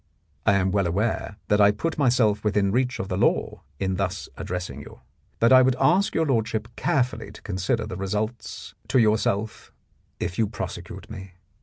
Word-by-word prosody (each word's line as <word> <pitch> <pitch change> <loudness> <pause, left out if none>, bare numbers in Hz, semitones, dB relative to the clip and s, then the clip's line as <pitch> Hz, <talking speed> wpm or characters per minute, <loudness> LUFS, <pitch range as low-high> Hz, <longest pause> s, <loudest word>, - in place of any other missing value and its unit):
I - - +6
am 95 -1 +2
well 100 -2 +1
aware 100 +2 -1
that 105 0 +3
I 100 - +7
put 150 +11 -2
myself 120 -6 +3
within 105 -2 +2
reach 125 +3 0
of 95 - -4
the 95 - -2
law - - +1 0.2
in 95 -1 -1
thus 95 0 -3
addressing 90 -6 -5
you, - - -13 0.4
but 115 +3 +5
I 130 - +9
would 130 0 +3
ask 175 +9 +3
your 160 - +2
lordship 110 -4 0
carefully 125 -5 0
to - - -13
consider 105 +4 -1
the 90 - -6
results 105 +4 -4
to - - +2
yourself 110 -2 +1 0.5
if 90 - -3
you 110 - +3
prosecute 100 -1 -7
me. 95 -3 -9
105 Hz, 175 wpm, -25 LUFS, 95-120 Hz, 0.5 s, I